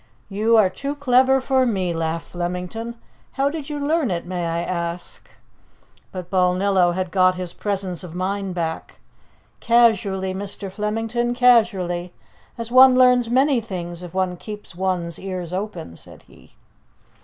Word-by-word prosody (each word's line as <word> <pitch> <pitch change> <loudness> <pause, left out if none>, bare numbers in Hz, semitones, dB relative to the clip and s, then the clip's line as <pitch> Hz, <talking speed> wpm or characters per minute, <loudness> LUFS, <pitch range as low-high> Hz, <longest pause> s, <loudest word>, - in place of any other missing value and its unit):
"You 215 +3 +2
are 195 -4 +4
too 280 +8 -4
clever 265 -1 +3
for 260 0 +2
me!" 190 -8 0
laughed 165 0 -3
Flemington. 180 +7 -4 0.4
"How 275 +1 +1
did 310 -2 -6
you 295 - -3
learn 290 -1 0
it, 170 -2 -3
may 175 -1 -3
I 165 +1 -2
ask?" 170 -1 -5 0.8
But 180 -1 -8
Balnillo 185 -1 +2
had 185 -1 -3
got 185 0 +3
his 180 -1 -5
presence 190 -4 -3
of 175 -2 -9
mind 190 0 -2
back. 160 -2 -4 0.6
"Casually, 205 -5 +2
Mr. 195 0 -6
Flemington, 225 +4 -2
casually 200 -8 +2 0.4
as 230 0 -6
one 255 0 +8
learns 250 -2 +4
many 265 +1 +3
things, 175 -5 -6
if 180 0 -9
one 185 -1 0
keeps 210 0 -9
one's 175 -2 -2
ears 185 -3 -5
open," 185 - -5
said - - -13
he. 65 - -21
190 Hz, 145 wpm, -22 LUFS, 180-235 Hz, 0.8 s, one